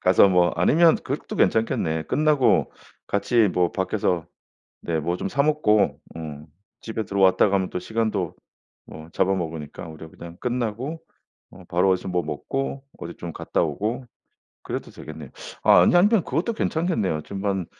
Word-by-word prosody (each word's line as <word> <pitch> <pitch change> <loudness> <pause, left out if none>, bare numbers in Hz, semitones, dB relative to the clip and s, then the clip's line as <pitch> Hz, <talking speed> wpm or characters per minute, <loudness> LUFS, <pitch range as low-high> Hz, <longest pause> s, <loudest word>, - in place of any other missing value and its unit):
가서 95 +2 +5
뭐 90 -1 +4
아니면 160 - +5
그것도 - - -5
괜찮겠네. 80 -8 +1
끝나고 150 -3 +2 0.3
같이 110 +1 +2
뭐 90 -1 +1
밖에서 95 -3 -1 0.6
네 80 -2 -1
뭐 85 +3 -1
좀 - - -3
사 140 0 +1
먹고 145 -9 +2 0.2
어 75 -2 -7 0.3
집에 110 -1 -4
들어왔다가 95 +1 +3
가면 95 -2 +1
또 - - -3
시간도 110 -3 -2 0.5
뭐 80 +1 -11
잡아먹으니까 85 -5 -2
오히려 80 0 -10
그냥 85 +1 -11
끝나고 125 +5 -3 0.5
어 95 - -14
바로 90 +2 +2
어디서 95 0 -1
뭐 90 -1 0
먹고 135 - -4 0.2
어디 85 - -7
좀 85 -2 -7
갔다 - - -1
오고 105 - -2 0.6
그래도 - - -5
되겠네요. 75 -3 -10 0.3
아 90 - +7
아니 90 - +4
아니면 205 0 +4
그것도 165 - -1
괜찮겠네요. 160 - -1
지금 100 0 -7
한 95 -3 0
95 Hz, 325 characters per minute, -24 LUFS, 85-120 Hz, 0.6 s, 아